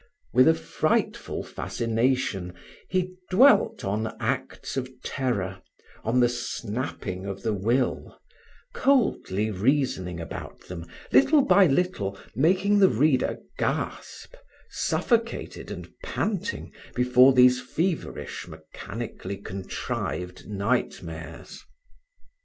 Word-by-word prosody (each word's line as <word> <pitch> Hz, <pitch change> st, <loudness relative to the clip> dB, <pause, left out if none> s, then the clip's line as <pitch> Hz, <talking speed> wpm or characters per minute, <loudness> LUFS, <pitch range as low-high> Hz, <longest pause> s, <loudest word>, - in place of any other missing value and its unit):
With 130 Hz, +1 st, +6 dB
a 160 Hz, -, +6 dB
frightful -, -, -1 dB
fascination, 115 Hz, -6 st, -1 dB, 0.3 s
he 185 Hz, -1 st, 0 dB, 0.2 s
dwelt 260 Hz, +9 st, +5 dB
on 105 Hz, +3 st, -2 dB
acts -, -, -3 dB
of 130 Hz, -1 st, -2 dB
terror, 100 Hz, -9 st, -2 dB, 0.4 s
on 120 Hz, +3 st, +2 dB
the 120 Hz, -, +6 dB
snapping 115 Hz, -5 st, -4 dB
of 100 Hz, 0 st, -6 dB
the 110 Hz, -, +1 dB
will, 115 Hz, +6 st, 0 dB, 0.6 s
coldly 155 Hz, -, +2 dB
reasoning 100 Hz, -, 0 dB
about 80 Hz, -, -7 dB
them, 85 Hz, -2 st, -8 dB, 0.2 s
little 290 Hz, 0 st, +6 dB
by 200 Hz, -8 st, +6 dB
little 135 Hz, -, 0 dB, 0.2 s
making 185 Hz, -, +3 dB
the 190 Hz, -, +7 dB
reader 130 Hz, +2 st, +2 dB, 0.2 s
gasp, -, -, -3 dB, 0.4 s
suffocated 230 Hz, -1 st, -1 dB
and -, -, -7 dB, 0.2 s
panting 210 Hz, -, -3 dB, 0.2 s
before 125 Hz, +1 st, +6 dB
these 125 Hz, -1 st, +6 dB
feverish 170 Hz, 0 st, -3 dB
mechanically 100 Hz, -2 st, -7 dB
contrived 95 Hz, -2 st, -5 dB
nightmares. 90 Hz, -7 st, -3 dB
125 Hz, 95 wpm, -26 LUFS, 100-155 Hz, 0.6 s, the